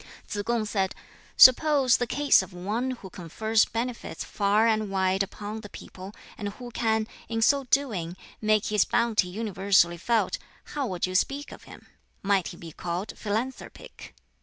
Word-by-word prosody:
Tsz 205 - -3
kung 235 0 0
said, 195 -3 -1 0.4
"Suppose 270 -1 +7
the 245 - -2
case 285 +4 +4
of - - -10
one 210 +8 -2
who 235 -7 -7
confers 215 +6 0
benefits 235 +2 -4
far 205 +2 +1
and 215 -2 +1
wide 190 0 +1
upon 210 +2 -5
the 205 - -10
people, 190 0 -10 0.3
and 205 - -3
who 240 +4 -10
can, 220 -2 0 0.2
in 225 -1 0
so 280 +3 +3
doing, 210 -11 -1 0.2
make 215 -1 +2
his 210 - +5
bounty 225 -5 +1
universally 190 -3 +1
felt 235 - 0 0.3
how 285 -3 -1
would 180 -4 -2
you 185 - -5
speak 275 +9 0
of - - -12
him? - - -14 0.4
Might 195 -3 +2
he 170 - -8
be 165 -1 -10
called 175 +5 -4
philanthropic?" 225 +5 -6
215 Hz, 160 wpm, -26 LUFS, 190-240 Hz, 0.4 s, Suppose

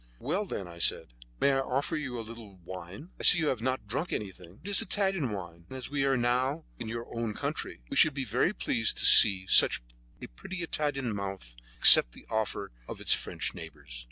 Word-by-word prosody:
"Well, 180 - -3
then," 95 - -7
I 85 0 -13
said, - - 0 0.3
"may 140 - +2
I 135 - 0
offer 135 +4 -3
you 135 -5 -5
a 115 - -6
little 110 -3 -13
wine? 95 - -10
I - - -8
see 180 - +7
you 155 -2 -1
have 125 -4 -3
not 130 -1 -3
drunk 140 - -4
anything. 95 -2 -8
It 200 - -8
is 205 - +1
Italian 195 - -1
wine, 85 -4 -9
and 130 - -9
as 130 - -8
we 145 -1 -1
are 135 -1 +1
now 130 +6 -1 0.2
in 115 - -7
your 115 +1 -6
own 115 -2 -4
country, - - -6
we - - -7
should 155 -3 +4
be 135 -2 -4
very 125 - 0
pleased 115 - -1
to - - +1
see 95 -3 +8
such 90 - +4 0.4
a - - -8
pretty 175 - -9
Italian 145 -7 -3
mouth 95 -11 -7 0.2
accept - - +9
the - - -16
offer 110 - -4 0.2
of - - -9
its - - +2
French - - -4
neighbors." - - -10
120 Hz, 215 wpm, -28 LUFS, 100-145 Hz, 0.4 s, accept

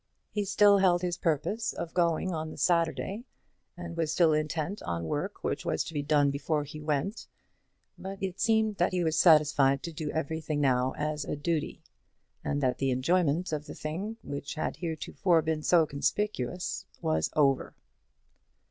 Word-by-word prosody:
He 210 -1 -1
still 200 0 +5
held 180 -2 +3
his 175 -1 0
purpose 175 +8 0
of 170 - -6
going 175 +1 +1
on 155 -1 -3
the - - -10
Saturday, 170 - 0 0.5
and 170 -1 -7
was 165 -2 0
still 160 -1 +4
intent 155 +5 -2
on 85 -1 -3
work 80 - -3
which - - -2
was - - 0
to - - -8
be 145 - -1
done 145 -1 +3
before 150 +2 -1
he 150 +1 -9
went; 150 +8 -2 0.7
but 195 +1 -6
it 190 -2 -4
seemed 220 -2 +2
that 175 - +1
he 180 -1 +1
was 160 -1 +1
satisfied 150 -5 +5
to 170 - -5
do 155 -1 -4
everything 160 0 -2
now 130 -2 +2
as 150 0 -2
a - - -3
duty, 155 +1 -2 0.6
and 145 0 -1
that 130 -2 0
the 135 - +1
enjoyment 165 +6 +1
of 150 0 -3
the - - -8
thing, 190 +9 -4
which 140 +1 -5
had 155 - -3
heretofore 165 0 0
been 155 0 -1
so 165 +1 +4
conspicuous, 175 +2 -2
was 80 0 0
over. 140 -3 +2
160 Hz, 170 wpm, -29 LUFS, 145-180 Hz, 0.7 s, still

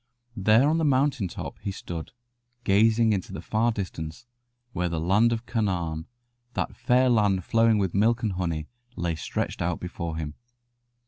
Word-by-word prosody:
There 110 +5 +4
on 160 +2 +2
the - - +1
mountain 135 -6 +2
top - - -7
he 100 - -4
stood, 85 -4 -6 0.5
gazing 110 +2 +4
into 95 -1 -3
the 95 - -5
far 115 +2 +1
distance, 85 -4 -5 0.5
where 90 0 0
the 85 -1 -2
Land 100 +8 +3
of 115 0 -2
Canaan, 85 -8 -1 0.5
that - - -2
fair 125 +1 +3
land 105 -6 +3
flowing 115 -1 +4
with 95 -4 0
milk 115 +4 +2
and 110 - +1
honey, 85 -4 -2 0.3
lay 85 -1 -1
stretched 80 - -3
out 85 0 -1
before 85 -2 -5
him. 75 -2 -4
100 Hz, 160 wpm, -26 LUFS, 85-115 Hz, 0.5 s, There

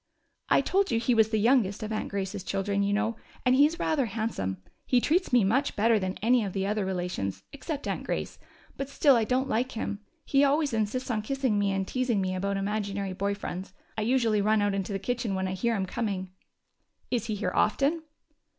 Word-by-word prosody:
"I - - +5
told 395 +1 +1
you 225 - +1
he 240 +2 +2
was 220 -1 +4
the 220 - +1
youngest 215 -2 +2
of 215 - -4
Aunt 215 - -2
Grace's 200 -1 -3
children, 200 +1 -1
you 200 0 +1
know, 220 +2 0 0.3
and 250 - +5
he's 295 +5 +4
rather 290 -7 +1
handsome. 205 - -2 0.3
He 250 - +4
treats 335 +8 +1
me 245 -3 +5
much 250 +9 +1
better 220 +1 +3
than 185 0 -3
any 240 +1 +4
of 195 -3 -4
the 195 -1 -1
other 210 +1 0
relations, 180 - -3
except 285 +1 -5
Aunt - - -2
Grace, - - -4 0.4
but 275 0 -4
still 280 -1 +4
I 230 -2 +2
don't 260 +3 +1
like 250 +2 0
him. 210 -2 -3 0.3
He 275 0 +3
always 285 0 +2
insists 225 +4 -1
on 215 -2 0
kissing 255 -2 0
me 200 -1 +1
and 195 0 -1
teasing 250 -4 0
me 185 -1 -1
about 200 +2 -1
imaginary 200 -1 -2
boy 200 +2 -1
friends. 190 -1 -6 0.2
I 220 - -2
usually 225 -2 +2
run 215 +1 +3
out 205 -1 +1
into 195 +1 -2
the 195 - -1
kitchen 230 0 -2
when 190 0 -1
I 185 - -2
hear 230 +4 0
him 195 -2 -1
coming." 190 -2 -3 0.8
"Is 235 -3 0
he 215 - -1
here 200 -3 -2
often?" 280 +9 +2
215 Hz, 215 wpm, -28 LUFS, 195-250 Hz, 0.8 s, I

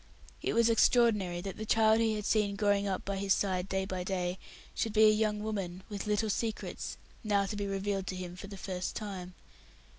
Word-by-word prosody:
It - - -1
was 230 0 +4
extraordinary 220 -6 +3
that 195 +1 -6
the 215 - -4
child 220 0 +4
he 225 -1 +2
had 210 -1 -4
seen 205 -2 +2
growing 205 0 +2
up 190 -1 -2
by 200 0 -2
his 195 0 +2
side 185 -1 -1
day 190 0 0
by 185 -2 -3
day 180 -1 -2 0.3
should 225 - -1
be 215 0 +5
a 215 - +9
young 210 -1 0
woman 190 -4 -4
with 205 0 -5
little 210 +1 +1
secrets, 220 +1 -3 0.3
now 205 -2 +2
to 210 - -4
be 205 -1 -2
revealed 195 -1 -2
to 185 - -3
him 180 -1 -6
for 195 +2 -8
the 200 0 -9
first 185 -1 -4
time. 185 -4 -6
200 Hz, 210 wpm, -31 LUFS, 190-215 Hz, 0.3 s, a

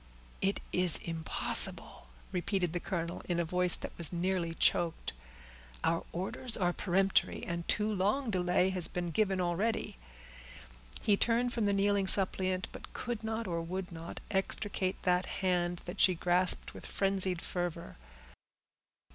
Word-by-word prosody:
"It 195 +1 0
is 180 -3 +5
impossible," 160 - +3 0.2
repeated 180 -1 -1
the 175 - -1
colonel, 170 -2 -4
in 175 -1 0
a 170 - 0
voice 180 +1 +1
that - - -8
was 170 - 0
nearly 175 -1 -1
choked. 170 -2 +1 0.7
"Our 165 0 0
orders 205 +7 -1
are 175 -3 +1
peremptory, 195 +1 +1
and 170 0 -4
too 210 +1 0
long 210 +6 0
delay 180 0 +1
has 180 -3 +4
been 175 -1 -4
given 195 +1 +1
already." 200 +4 -1 1.1
He 205 -2 +3
turned 240 +2 +1
from 225 -4 0
the - - +2
kneeling 200 0 +1
suppliant, 185 -1 +2
but - - -11
could 240 -3 -5
not, 220 +1 -3
or 170 -2 -2
would 180 +2 -5
not, 165 0 -8
extricate 190 -1 -1
that 180 0 +1
hand 175 -2 -1
that 180 +3 -4
she 185 - +5
grasped 180 +2 +1
with - - -9
frenzied 190 -2 +2
fervor. 175 -2 -4
185 Hz, 145 wpm, -31 LUFS, 175-195 Hz, 1.1 s, is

